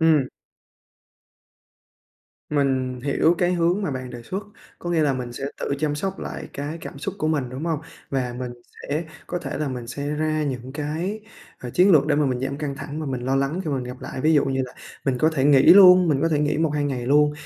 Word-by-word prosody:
Ừm. 155 -5 +4 2.2
Mình 130 -3 0
hiểu 145 +5 +2
cái 180 0 +2
hướng 175 +4 +1
mà 190 - -1
bạn 130 -2 -5
đề 120 -1 -8
xuất, 190 - -4 0.4
có 175 - -5
nghĩa 170 -2 +2
là 145 -2 +2
mình 125 -2 -4
sẽ 135 - -6 0.2
tự 140 - -1
chăm 150 0 0
sóc 190 +6 -3
lại - - -6
cái 145 +4 -5
cảm 140 - -8
xúc 190 +6 -4
của 155 - 0
mình, 145 -5 0
đúng 130 +5 -6
hông? 160 -3 -1 0.3
Và 125 -3 -1
mình 125 -1 -4 0.3
sẽ 155 +4 -2 0.2
có 175 - -3
thể 145 -6 -5
là 150 -2 -1
mình 125 -2 -5
sẽ 140 +4 -5
ra 155 +1 0
những 130 -3 -4
cái, 160 +8 -3 0.4
ờ, 125 - -7
chiến 185 +9 +4
lược 150 -2 +5
để 150 - +2
mà 150 -1 +3
mình 125 -2 -1
giảm 135 +1 -2
căng 145 -2 -3
thẳng 145 +2 -6
và 155 - -4
mình 130 -2 -3
lo 130 +2 0
lắng 140 +7 0
khi 155 - -2
mà 140 - 0
mình 125 - -3
gặp 125 +1 -8
lại. - - -6
Ví 155 +3 +3
dụ 145 - +4
như 135 -1 0
là 125 - -11 0.3
mình 130 -2 0
có 155 +5 +3
thể 140 -4 0
nghỉ 140 -2 +6
luôn 180 -2 +8
mình 140 -3 +2
có 165 - +3
thể 155 -2 +1
nghỉ 150 -1 +1
1-2 150 -2 +1
ngày 125 -4 -2
luôn, 150 +2 +4
145 Hz, 240 wpm, -23 LUFS, 130-160 Hz, 2.2 s, luôn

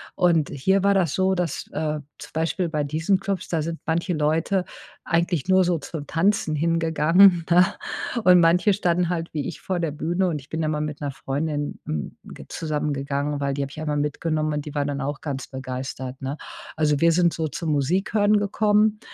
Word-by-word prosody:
Und 170 -4 +3
hier 190 +8 +1
war 200 0 +4
das 180 -7 +1
so, 190 0 +2
dass, 175 -5 -2
äh, 155 0 -1 0.2
zum - - -11
Beispiel 165 +2 -1
bei 150 -2 -1
diesen 160 +7 +1
Klubs, 195 -2 -3
da 165 -2 0
sind 165 +1 -4
manche 170 +3 0
Leute 160 +5 +1 0.4
eigentlich 170 -2 0
nur 190 0 +5
so 175 -1 +1
zum 150 0 -7
Tanzen 195 0 +1
hingegangen, 165 +3 +4
ne? 175 +1 +6 0.6
Und 180 -2 +7
manche 175 +5 +4
standen 180 -3 +1
halt 170 -2 -3
wie 150 -3 -2
ich 170 - -7
vor 185 -2 -2
der 165 -3 -1
Bühne 170 +5 0
und 160 -4 -1
ich 135 - -17
bin 160 - -3
immer 155 -1 0
mit 150 -1 -4
'ner 145 -1 -2
Freundin, 145 +2 -3
hm, 75 -1 -4
ge - - -11
zusammen 150 -2 -2
gegangen, 140 +1 -2
weil 140 -1 -1
die 140 - -2
habe 140 0 -4
ich 155 - -9
einmal 150 -1 -1
mitgenommen 155 +1 -1
und 150 -1 -3
die 150 0 -8
war 145 -1 0
dann 145 0 -3
auch 140 +1 -3
ganz 135 -3 -4
begeistert, 130 0 -6
ne? 135 +3 -4 0.4
Also, 150 -2 +2
wir 170 +2 +5
sind 170 0 +3
so 160 -1 -2
zum 155 +3 -3
Musikhören 195 +8 +2
gekommen 210 +1 +2
160 Hz, 200 wpm, -24 LUFS, 145-180 Hz, 0.6 s, Und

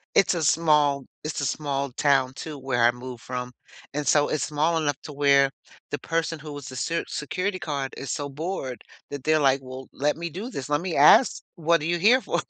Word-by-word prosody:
It's 185 -2 +4
a 165 - -1
small 150 -3 +3 0.2
it's 155 -1 -3
a 140 - 0
small 140 0 -2
town 135 -2 +2
too 150 +1 -7
where 125 -3 0
I 120 - +6
moved 120 0 -9
from. 125 0 -5 0.4
And 150 - -2
so 145 +1 +4
it's 155 - -1
small 155 +2 +1
enough 145 -4 0
to 150 - -8
where 140 -1 +4 0.4
the 145 - -2
person 165 -1 -2
who 150 0 -9
was 145 -3 -8
the 130 - -8
ser 165 +6 -1
security 185 +6 -3
card 145 -5 -4
is 135 - -5
so 145 -3 -3
bored 140 -3 -4 0.3
that 140 -2 -6
they're 155 0 +3
like, 135 -2 +3
"Well, 130 0 -9
let 145 +2 0
me 170 +1 -4
do 200 - -6
this. 135 - -6
Let 145 +1 +1
me 180 -2 -3
ask. 215 - +6
'What 170 -1 +2
are 150 - -3
you 175 +1 +1
here 235 +8 +5
for?'" - - -1
145 Hz, 220 wpm, -25 LUFS, 135-165 Hz, 0.4 s, I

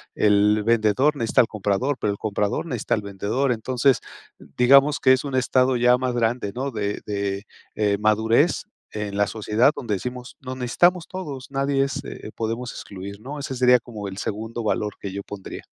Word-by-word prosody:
El 105 0 +3
vendedor 115 +6 +3
necesita 115 -4 0
al 120 - +1
comprador, 110 +6 -1
pero 105 - +1
el 100 - -6
comprador 105 +5 -1
necesita 125 -9 -1
al 110 - -3
vendedor. 100 +7 -1
Entonces, 125 +3 +1 0.4
digamos, 140 +4 +4
que 130 - +6
es 130 - +1
un 140 -2 -3
estado 130 0 +2
ya 125 +1 +4
más 130 -1 -1
grande, 115 -2 0
¿no?, 135 +3 -3
de 105 -3 -2
de, 100 -1 -3 0.3
eh, 105 -1 +1
madurez, 110 - +2 0.3
en 105 -1 -4
la 105 0 +3
sociedad 110 +5 +2
donde 110 -5 -2
decimos: 125 +5 -6
"Nos 130 -1 -6
necesitamos 170 +8 +2
todos". 145 -9 -6
Nadie 135 0 +1
es 135 - -3
eh, 110 - -8
podemos 115 +2 -3
excluir, 100 +1 -8
¿no? 140 +5 -7
Ese 140 -1 -4
sería, 125 0 +5
como 110 -3 -8
el 95 - -9
segundo 110 +3 -4
valor, 105 -1 -1
que 100 - -5
yo 100 +1 -5
pondría. 100 -1 -8
115 Hz, 185 wpm, -23 LUFS, 105-130 Hz, 0.4 s, que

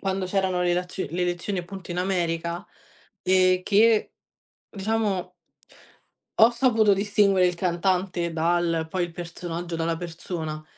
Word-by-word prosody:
quando 190 -1 -1
c'erano 185 -1 0
le 175 0 +2
lazio 180 +1 -3
le 180 +2 -1
elezioni, 175 +2 -2
appunto 180 +1 -8
in 175 - -3
America, 170 -2 -1 0.6
ehm, 185 0 +3
che, 215 +2 +3 0.6
diciamo 200 -3 -2 1.1
ho 225 +2 +8
saputo 235 -4 +3
distinguere 200 -2 +3
il 180 - -3
cantante 180 0 0
dal 165 0 +1
poi 180 +2 -1
il 175 - -2
personaggio 170 0 -6
dalla 165 0 -1
persona, 160 -2 -6
180 Hz, 130 wpm, -25 LUFS, 170-195 Hz, 1.1 s, ho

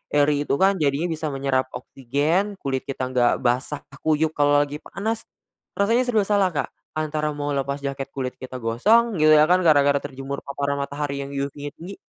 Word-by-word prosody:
airy 145 0 +2
itu - - +2
kan 190 +2 +3
jadinya 145 +3 +1
bisa 155 -1 -3
menyerap 135 -2 0
oksigen, 150 - -1
kulit 135 -1 -2
kita 130 -1 -3
enggak 120 -2 +3
basah 125 +4 0 0.2
kuyup 155 0 +1
kalo 145 -1 +3
lagi 145 +1 -6
panas. 220 +7 -4 0.5
Rasanya 230 +5 +2
serba 220 -4 +2
salah 200 -2 +2
Kak, - - 0 0.3
antara 155 -1 -2
mau 145 0 -3
lepas 140 0 -2
jaket, 135 -1 -3
kulit 130 -2 -2
kita 130 0 -8
gosong, 210 - +3
gitu 155 0 +6
ya 150 - +7
kan 180 +4 +4
gara-gara 145 -4 +4
terjemur 140 0 -6
paparan 140 0 -2
matahari 140 0 -3
yang 140 0 -5
UV-nya 140 +1 -4
tinggi. 180 +4 -9
145 Hz, 180 wpm, -23 LUFS, 140-160 Hz, 0.5 s, ya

